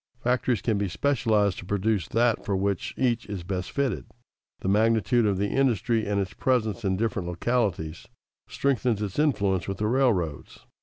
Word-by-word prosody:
Factories 125 Hz, -3 st, 0 dB
can 110 Hz, -4 st, +1 dB
be 100 Hz, -, 0 dB
specialized 110 Hz, -2 st, +1 dB
to -, -, -9 dB
produce 100 Hz, -2 st, 0 dB
that 115 Hz, 0 st, +1 dB
for 100 Hz, -, -1 dB
which 100 Hz, -1 st, -2 dB
each 120 Hz, -2 st, 0 dB
is 100 Hz, -4 st, -5 dB
best 90 Hz, 0 st, -3 dB
fitted. 140 Hz, -3 st, -2 dB, 0.5 s
The -, -, -3 dB
magnitude 110 Hz, +1 st, +3 dB
of 100 Hz, -2 st, +1 dB
the 100 Hz, +1 st, 0 dB
industry 115 Hz, -4 st, +1 dB
and 100 Hz, -1 st, 0 dB
its 95 Hz, -3 st, -3 dB
presence 120 Hz, -3 st, 0 dB
in 95 Hz, -2 st, 0 dB
different 105 Hz, -4 st, -1 dB
localities 90 Hz, -4 st, -1 dB, 0.4 s
strengthens 125 Hz, -6 st, 0 dB
its 100 Hz, +5 st, -4 dB
influence 100 Hz, -, +1 dB
with 95 Hz, -1 st, -3 dB
the 105 Hz, -, -1 dB
railroads. 105 Hz, -, 0 dB
105 Hz, 165 wpm, -26 LUFS, 95-120 Hz, 0.5 s, magnitude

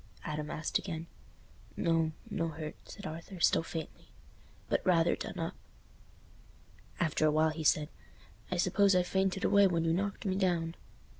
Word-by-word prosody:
Adam 150 Hz, 0 st, -4 dB
asked 155 Hz, -, -1 dB
again 165 Hz, -4 st, -5 dB, 0.7 s
"No—no 165 Hz, +3 st, 0 dB
hurt," 155 Hz, -1 st, -5 dB, 0.2 s
said 200 Hz, -, -9 dB
Arthur, 165 Hz, +3 st, -7 dB
still -, -, +4 dB
faintly, 165 Hz, -1 st, -7 dB, 0.6 s
"but -, -, 0 dB
rather 170 Hz, -2 st, +4 dB
done -, -, -6 dB
up." -, -, -2 dB, 1.5 s
After 155 Hz, -2 st, +2 dB
a -, -, +4 dB
while 155 Hz, +1 st, +3 dB
he 155 Hz, 0 st, -5 dB
said, 150 Hz, 0 st, +3 dB, 0.6 s
"I 185 Hz, -, -1 dB
suppose 195 Hz, +2 st, +4 dB
I 180 Hz, -, +4 dB
fainted 190 Hz, +1 st, 0 dB
away 200 Hz, -1 st, +6 dB
when 170 Hz, -2 st, 0 dB
you 165 Hz, -, +2 dB
knocked 200 Hz, +4 st, -2 dB
me 190 Hz, -, +1 dB
down." 175 Hz, -4 st, +1 dB
165 Hz, 150 wpm, -32 LUFS, 160-190 Hz, 1.5 s, away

